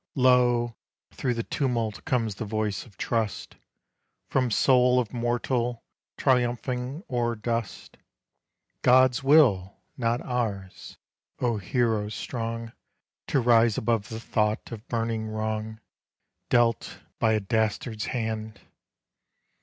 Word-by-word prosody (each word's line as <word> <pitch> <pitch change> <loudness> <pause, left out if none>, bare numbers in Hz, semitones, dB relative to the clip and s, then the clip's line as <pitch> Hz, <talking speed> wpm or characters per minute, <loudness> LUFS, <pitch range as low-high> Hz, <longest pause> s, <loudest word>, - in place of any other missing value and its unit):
Lo! 125 -3 +3 0.4
through 125 -2 -2
the 115 - -2
tumult 115 -7 -2
comes 120 -7 0
that 105 - -5
voice 110 +1 -2
of 100 -5 -20
trust 110 -3 -2 0.7
From 130 -2 +2
soul 125 +2 +4
of 120 -2 -3
mortal 120 0 -1 0.3
triumphing 125 - 0
o'er 120 -2 0
dust: 115 -1 -4 0.8
"God's 130 +1 +5
will, 125 - +4 0.2
not 120 -1 0
ours;" 105 -7 -4 0.4
O 120 -3 +1
hero 110 0 0
strong 115 +1 -5 0.5
To 140 - +2
rise 115 -2 +4
above 115 -2 0
the 110 - -5
thought 110 -1 -1
of 110 -1 -8
burning 115 -1 -2
wrong 110 0 -3 0.7
Dealt 120 -2 +1 0.2
by 110 -1 +3
a 110 - +2
dastard's 110 +1 -1
hand! 110 -3 -3
115 Hz, 110 wpm, -26 LUFS, 110-125 Hz, 0.8 s, God's